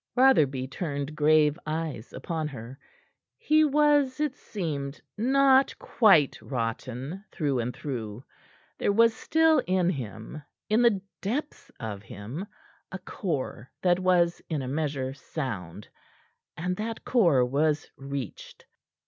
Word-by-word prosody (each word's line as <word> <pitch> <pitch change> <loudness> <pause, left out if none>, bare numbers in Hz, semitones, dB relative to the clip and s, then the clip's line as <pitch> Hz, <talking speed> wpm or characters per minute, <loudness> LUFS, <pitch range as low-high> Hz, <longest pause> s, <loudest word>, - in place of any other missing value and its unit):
Rotherby 145 - +4
turned 145 0 -4
grave 150 0 +4
eyes 155 -6 -4
upon 155 +3 -3
her. 130 -1 -9 0.6
He 310 -9 +4
was, 290 -2 +3
it 300 -3 0
seemed, 150 - -4 0.2
not 265 +3 +4
quite 190 - +4
rotten 130 - -4
through 145 -6 0
and 120 +1 -1
through; 120 -5 -6 0.6
there - - +2
was 230 +2 +5
still 320 +2 +3
in 180 -1 +2
him 120 - -6 0.3
in 215 +3 +4
the 230 -5 +4 0.2
depths 275 +6 -3
of 105 -4 -5
him 115 - -7 0.4
a 190 - -4
core 145 - -4
that 180 -1 +4
was 180 -2 +2
in 150 -5 -1
a - - -5
measure 140 -2 -2
sound; 110 - -6 0.7
and 180 +3 -1
that 225 +1 -4
core 170 - +4
was 150 +4 +1
reached. 135 -4 -7
155 Hz, 125 wpm, -27 LUFS, 130-210 Hz, 0.7 s, was